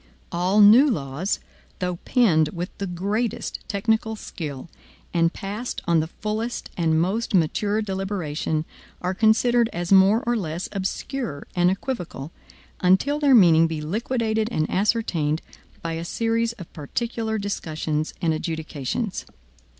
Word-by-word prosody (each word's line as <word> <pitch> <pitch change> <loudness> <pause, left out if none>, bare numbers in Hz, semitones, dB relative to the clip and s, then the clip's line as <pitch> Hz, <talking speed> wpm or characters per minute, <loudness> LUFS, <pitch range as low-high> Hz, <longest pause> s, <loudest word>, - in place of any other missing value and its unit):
All 185 +4 +3
new 230 +8 +8
laws, 155 - -2 0.4
though 180 -1 -2
penned 175 - +3
with 175 +1 -5
the 200 - -2
greatest 200 +6 -2
technical 220 +2 0
skill, 150 -9 -7 0.5
and 165 -1 +3
passed 210 +6 -5
on 170 -1 +3
the 155 - -1
fullest 215 +6 -4
and 160 -2 +2
most 200 +6 0
mature 205 +6 +1
deliberation, 185 -6 -2 0.3
are 180 +1 -1
considered 230 +3 +3
as 175 +1 -4
more 195 +4 +6
or 240 0 +1
less 175 -4 -3
obscure 195 - -3
and 175 0 +4
equivocal, 185 - -4 0.5
until 190 +11 +3
their 285 -3 +5
meaning 165 -6 +6
be 160 -1 -3
liquidated 220 +6 -1
and 155 -8 0
ascertained 180 -7 +1 0.4
by 165 -1 -2
a 165 +1 -3
series 230 +5 0
of 180 -8 -12
particular 220 +7 -3
discussions 155 -6 -3
and 165 -1 +3
adjudications. 160 - -3
190 Hz, 130 wpm, -24 LUFS, 165-220 Hz, 0.5 s, new